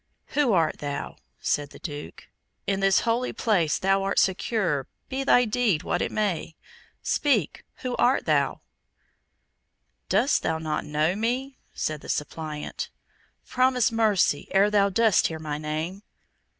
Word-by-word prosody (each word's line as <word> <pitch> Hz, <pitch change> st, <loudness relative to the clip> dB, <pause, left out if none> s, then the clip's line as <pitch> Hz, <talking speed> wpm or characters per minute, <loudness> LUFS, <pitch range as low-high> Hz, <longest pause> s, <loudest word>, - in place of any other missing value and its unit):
"Who 285 Hz, -5 st, +2 dB
art 165 Hz, -4 st, +2 dB
thou?" 145 Hz, -1 st, -5 dB, 0.2 s
said 145 Hz, -1 st, 0 dB
the -, -, -13 dB
Duke. 145 Hz, -3 st, -8 dB, 0.4 s
"In 195 Hz, -1 st, 0 dB
this 195 Hz, 0 st, +4 dB
holy 235 Hz, +2 st, 0 dB
place 180 Hz, -, +1 dB
thou 195 Hz, +1 st, +2 dB
art 195 Hz, 0 st, -1 dB
secure, 185 Hz, -, +1 dB, 0.2 s
be 270 Hz, +1 st, -2 dB
thy 250 Hz, -2 st, +5 dB
deed 220 Hz, -8 st, +1 dB
what 175 Hz, -, -1 dB
it -, -, -1 dB
may. 190 Hz, -6 st, -1 dB, 0.5 s
Speak! 245 Hz, -, +1 dB, 0.2 s
who 250 Hz, -1 st, -2 dB
art 255 Hz, +2 st, +3 dB
thou?" -, -, +1 dB, 1.5 s
"Dost 235 Hz, +9 st, +3 dB
thou 160 Hz, -, 0 dB
not 155 Hz, -1 st, -3 dB
know 150 Hz, +4 st, +1 dB
me?" 250 Hz, +5 st, -2 dB, 0.2 s
said 155 Hz, -1 st, -2 dB
the -, -, -11 dB
suppliant. 150 Hz, 0 st, -4 dB, 0.6 s
"Promise 255 Hz, -3 st, +2 dB
mercy, 215 Hz, -9 st, +2 dB
ere 200 Hz, +2 st, +3 dB
thou 200 Hz, -1 st, +4 dB
dost 220 Hz, 0 st, +3 dB
hear 160 Hz, -, -5 dB
my 150 Hz, -1 st, -4 dB
name." 155 Hz, +5 st, -4 dB
195 Hz, 140 wpm, -26 LUFS, 155-230 Hz, 1.5 s, thy